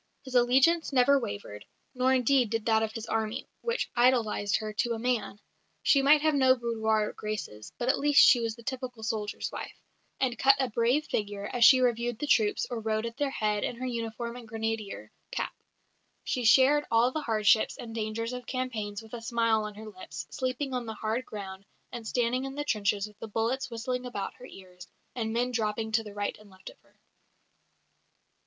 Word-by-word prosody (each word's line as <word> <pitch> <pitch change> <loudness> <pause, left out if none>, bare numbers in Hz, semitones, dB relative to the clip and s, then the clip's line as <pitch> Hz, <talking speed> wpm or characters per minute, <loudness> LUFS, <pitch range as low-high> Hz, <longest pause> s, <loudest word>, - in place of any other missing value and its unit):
His 260 -2 -10
allegiance 265 +8 +4
never 275 +1 +4
wavered, 200 - -6 0.3
nor 255 0 +2
indeed 255 -1 +3
did 225 -1 -2
that 220 -1 +3
of 220 -1 -1
his 225 0 -5
army, 220 0 -2 0.2
which 470 +1 -1
idolised 235 -5 +2
her 215 -1 -3
to 235 +2 0
a - - -3
man. 230 -3 -2 0.4
She 275 - +5
might 295 +2 +5
have 310 -1 +3
no 260 -2 +5
boudoir 220 -3 0
graces, 210 - -6
but 240 - -3
at 260 - +2
least 290 0 +4
she 245 - +6
was 230 -1 -2
the 235 - -14
typical 250 -3 -5
soldier's 215 -1 -3
wife, - - -7 0.4
and 250 -3 0
cut 275 +1 +6
a 260 -3 0
brave 240 +7 +2
figure, 205 -4 -3
as 245 - +2
she 260 +2 +8
reviewed 240 -1 0
the 295 - -3
troops 220 -7 +2
or 240 - -2
rode 220 0 -1
at 230 0 -5
their 290 -1 0
head 210 -5 -1
in - - -2
her 255 +2 -5
uniform 235 -1 -4
and 240 -2 -11
grenadier 220 - -4 0.2
cap. - - -3 0.7
She 250 -2 -2
shared 270 +6 +5
all 230 +2 +3
the 310 - -3
hardships 220 -3 +2
and 225 -1 -8
dangers 225 +2 -3
of 250 0 -7
campaigns 225 -5 -3
with 220 - -16
a 235 - -5
smile 230 -2 +1
on 210 -1 -7
her 215 +1 -9
lips, 200 -4 -8
sleeping 260 +1 -3
on 245 -2 -3
the 220 - -5
hard 225 +4 -2
ground, 195 -2 -7 0.3
and 235 -3 -7
standing 250 +2 0
in 270 0 -6
the 290 - -2
trenches 205 -5 0
with 210 0 -14
the 225 - -6
bullets 235 +6 -1
whistling 250 +2 -3
about 200 -5 -4
her 250 - -10
ears, 180 -4 -13 0.3
and 225 -3 -3
men 245 +2 0
dropping 220 -1 -1
to 220 -2 0
right 205 0 -3
and 210 -1 -17
left 190 0 -12
of - - -23
her. - - -31
230 Hz, 200 wpm, -29 LUFS, 215-255 Hz, 0.7 s, she